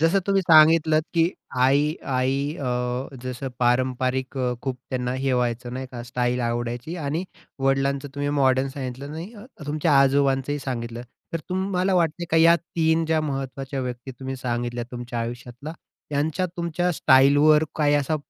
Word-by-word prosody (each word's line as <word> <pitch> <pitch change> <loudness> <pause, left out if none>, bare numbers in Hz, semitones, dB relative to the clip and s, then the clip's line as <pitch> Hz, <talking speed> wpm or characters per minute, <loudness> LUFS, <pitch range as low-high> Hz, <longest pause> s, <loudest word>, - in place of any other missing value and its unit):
जसं 165 +5 +3
तुम्ही 195 -1 +2
सांगितलत, 155 -1 +6
की 165 - +4 0.4
आई 140 +4 +3 0.2
आई 130 +1 +1 0.2
अ, 140 - -5 0.6
जसं 130 +1 -4
पारंपरिक 130 +1 0
अ, 125 -1 0
खूप 130 -2 -3
त्यांना 125 -1 -1
हे 135 - +2
व्हायचं 120 0 -1
नाही 130 +1 -4
का 120 -1 -6
स्टाईल 125 0 -1
आवडायची 120 +6 -3
आणि 160 +2 -2 0.4
वडिलांचं 135 +1 +1
तुम्ही 145 0 -2
मॉडर्न 130 0 +3
सांगितलं 135 +1 -6 0.3
अ, - - -12 0.2
तुमच्या 150 0 +2
आजोबांचंही 140 +1 +2
सांगितलं 120 -3 -5 0.3
तर 165 - -2
तुम्हाला 190 0 0
वाटतंय 170 -1 +1
का 160 - +3
या 165 +1 +7
3 165 -1 0
ज्या 160 0 +2
महत्वाच्या 135 -2 -4
व्यक्ती 125 +1 -5
तुम्ही 130 +1 -6
सांगितल्या 120 -1 -3
तुमच्या 120 -1 -5
आयुष्यातला, 120 +5 -6 0.4
त्यांच्या 150 +5 0
तुमच्या 175 0 -2
स्टाईलवर 145 +2 +5
काही 145 -2 +3
असा 145 +2 +1
135 Hz, 150 wpm, -24 LUFS, 125-155 Hz, 0.6 s, या